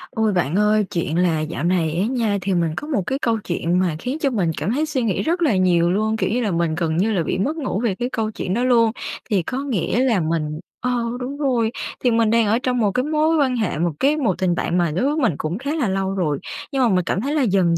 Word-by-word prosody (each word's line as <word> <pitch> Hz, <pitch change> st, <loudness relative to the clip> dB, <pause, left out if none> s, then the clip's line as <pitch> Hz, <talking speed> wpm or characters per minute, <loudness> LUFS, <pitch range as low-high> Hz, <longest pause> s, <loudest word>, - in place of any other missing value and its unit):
Ôi, 220 Hz, -2 st, +1 dB
bạn 175 Hz, -2 st, 0 dB
ơi, 210 Hz, 0 st, +3 dB
chuyện 170 Hz, -3 st, -1 dB
là 175 Hz, -3 st, +2 dB
dạo 155 Hz, +2 st, -4 dB
này 170 Hz, -3 st, +1 dB
á 200 Hz, -, +2 dB
nha, 230 Hz, -4 st, 0 dB
thì 195 Hz, +1 st, -1 dB
mình 170 Hz, -2 st, +1 dB
có 295 Hz, -, -4 dB
một 245 Hz, -11 st, 0 dB
cái 270 Hz, -, -1 dB
câu 230 Hz, -2 st, +1 dB
chuyện 175 Hz, 0 st, 0 dB
mà 180 Hz, -4 st, +1 dB
khiến 255 Hz, -, -3 dB
cho 290 Hz, -4 st, +1 dB
mình 195 Hz, -10 st, 0 dB
cảm 205 Hz, -, -1 dB
thấy 300 Hz, +4 st, +1 dB
suy 305 Hz, -4 st, -2 dB
nghĩ 210 Hz, -5 st, 0 dB
rất 345 Hz, +3 st, 0 dB
là 295 Hz, -11 st, +3 dB
nhiều 175 Hz, -2 st, +3 dB
luôn, 215 Hz, +3 st, 0 dB
kiểu -, -, 0 dB
như 245 Hz, +3 st, 0 dB
là, 215 Hz, -4 st, 0 dB
mình 170 Hz, -2 st, 0 dB
gần 160 Hz, -1 st, -1 dB
như 205 Hz, +5 st, +2 dB
là 185 Hz, -6 st, +1 dB
bị -, -, -2 dB
mất 275 Hz, +12 st, -1 dB
ngủ 260 Hz, -, -2 dB
về 215 Hz, -6 st, +1 dB
cái 245 Hz, +5 st, -3 dB
câu 225 Hz, -4 st, -2 dB
chuyện 185 Hz, -3 st, -3 dB
đó 240 Hz, +4 st, 0 dB
luôn. 235 Hz, -3 st, +4 dB, 0.4 s
Thì 200 Hz, -5 st, +1 dB
có 260 Hz, +10 st, -3 dB
nghĩa 235 Hz, -4 st, -1 dB
là 235 Hz, -7 st, +2 dB
mình 155 Hz, -2 st, -2 dB, 0.2 s
ờ, 245 Hz, -1 st, 0 dB, 0.2 s
đúng 265 Hz, +3 st, -5 dB
rồi, 250 Hz, -6 st, +1 dB, 0.3 s
thì 245 Hz, -, +3 dB
mình 225 Hz, -1 st, +3 dB
đang 230 Hz, -1 st, +3 dB
ở 220 Hz, +3 st, +2 dB
trong 250 Hz, -1 st, 0 dB
một 210 Hz, -4 st, +2 dB
cái 250 Hz, +5 st, 0 dB
mối 310 Hz, +2 st, +2 dB
quan 265 Hz, -4 st, +2 dB
hệ, 215 Hz, -9 st, -1 dB
một 170 Hz, +2 st, +1 dB
cái 290 Hz, +3 st, +3 dB
một 230 Hz, -, 0 dB
tình 180 Hz, -2 st, +1 dB
bạn 170 Hz, -, -1 dB
mà 170 Hz, -3 st, +1 dB
đối 215 Hz, -, +1 dB
với 290 Hz, +2 st, +1 dB
mình 230 Hz, -, +2 dB
cũng 160 Hz, +4 st, -3 dB
khá 280 Hz, +6 st, -3 dB
là 270 Hz, -10 st, 0 dB
lâu 195 Hz, 0 st, -1 dB
rồi, 155 Hz, -7 st, 0 dB, 0.3 s
nhưng 270 Hz, -2 st, 0 dB
mà 240 Hz, -, +4 dB
mình 185 Hz, -3 st, +2 dB
cảm 190 Hz, -, -1 dB
thấy 280 Hz, +5 st, -2 dB
là 300 Hz, -, +2 dB
dần 185 Hz, -7 st, +2 dB
215 Hz, 280 wpm, -21 LUFS, 175-250 Hz, 0.4 s, luôn